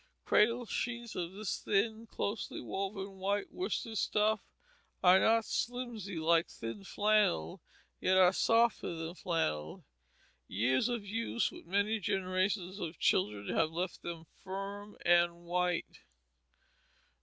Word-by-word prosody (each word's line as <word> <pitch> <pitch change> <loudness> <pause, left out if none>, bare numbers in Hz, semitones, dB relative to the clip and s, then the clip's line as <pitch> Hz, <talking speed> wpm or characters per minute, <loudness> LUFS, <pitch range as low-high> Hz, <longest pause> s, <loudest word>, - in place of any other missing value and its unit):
Cradle 235 +3 +3
sheets 235 0 -3
of 175 0 -3
this 205 0 -3
thin, 220 +3 0
closely 205 0 -3
woven, 195 0 -4
white 200 +2 -1
worsted 235 - -2
stuff 215 0 +2 0.6
are 185 +1 +8
not 225 +3 +4
slimsy 235 -6 -3
like 165 +1 +3
thin 115 -3 -7
flannel, 205 - +1 0.4
yet 185 0 +3
are 185 0 +6
softer 230 -4 +2
than 165 +1 -5
flannel. 80 - -2 0.6
Years 130 - +1
of 235 -4 -2
use 230 +3 -1
with - - -12
many 200 +4 +1
generations 185 0 -1
of 165 -3 -5
children 105 -1 +1
have 160 -1 +3
left 175 +3 -3
them 165 -1 -6 0.2
firm 200 +2 -6
and 175 0 +4
white. 180 0 -1
190 Hz, 120 wpm, -33 LUFS, 170-215 Hz, 0.6 s, are